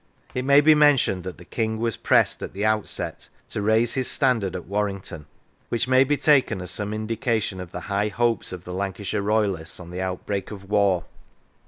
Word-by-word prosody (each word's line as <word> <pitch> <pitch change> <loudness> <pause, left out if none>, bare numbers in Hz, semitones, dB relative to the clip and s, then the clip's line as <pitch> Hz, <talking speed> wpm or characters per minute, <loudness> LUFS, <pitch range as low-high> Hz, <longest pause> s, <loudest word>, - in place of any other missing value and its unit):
It 125 0 -2
may 140 +1 +6
be 155 +1 +6
mentioned 145 -11 +3
that 95 - -6
the 90 - -13
King 110 +3 -2
was 115 -1 -1
pressed - - +2
at - - -6
the 100 +2 -2
outset 110 -1 -2 0.2
to - - -3
raise 110 +3 +2
his 130 -2 +2
standard 115 - +1
at 90 - -6
Warrington, 95 -6 -3 0.4
which 120 +1 0
may 130 +1 +5
be 145 +2 +1
taken 135 -7 +3
as 90 -1 -5
some 105 0 -3
indication 110 -2 -2
of 90 -1 -8
the 90 - -6
high 100 +2 -1
hopes 115 +1 0
of 90 -1 -7
the 90 - -7
Lancashire 100 +2 -3
royalists 100 -6 -1
on 85 -1 -10
the 90 +1 -4
outbreak 95 +1 -3
of 100 -2 -9
war. 100 -4 +2
105 Hz, 195 wpm, -24 LUFS, 95-115 Hz, 0.4 s, may